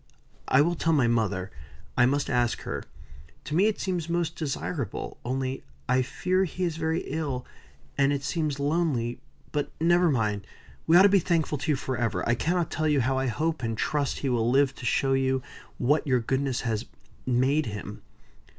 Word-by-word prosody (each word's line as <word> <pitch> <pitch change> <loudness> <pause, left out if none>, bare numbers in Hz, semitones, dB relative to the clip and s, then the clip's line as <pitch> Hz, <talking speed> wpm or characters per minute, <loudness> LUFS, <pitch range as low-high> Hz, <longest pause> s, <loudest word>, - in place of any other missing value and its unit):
"I 130 - +5
will 170 +4 +2
tell 165 -1 +1
my 135 -6 +4
mother. 100 -5 0 0.4
I 125 - +5
must 140 +2 0
ask 120 -1 +1
her. - - -4 0.6
To 150 - -6
me 190 +6 +4
it 220 - -1
seems 175 -3 -2
most 170 -1 0
desirable. 140 - -4
Only, 130 +1 -2 0.2
I 130 - +3
fear 185 +8 0
he 185 +1 -4
is 170 -3 0
very 160 +1 0
ill; 140 -4 -3 0.5
and 140 0 +4
it 140 -1 -1
seems 150 -1 -1
lonely; 140 -6 0 0.3
but 145 -1 -2
never 175 +2 +4
mind! 105 -7 0 0.4
We 165 +2 +7
ought 185 - +8
to 200 - +7
be 200 0 +5
thankful 160 -4 0
to 150 +3 0
you - - +1
forever. 120 -8 -2
I 120 - +4
cannot 170 +6 0
tell 155 0 0
you 145 -3 +3
how 130 +2 +1
I 135 - 0
hope 155 +5 -1
and 115 -2 -2
trust 145 +2 0
he - - +2
will 120 -2 +1
live 135 +1 +3
to 125 - -8
show 135 -1 +2
you 130 -1 +1 0.3
what 145 +5 +1
your 130 -2 +3
goodness 130 +2 -1
has 115 -1 -2 0.4
made 130 +4 +2
him." 105 -2 -6
140 Hz, 185 wpm, -27 LUFS, 125-160 Hz, 0.6 s, ought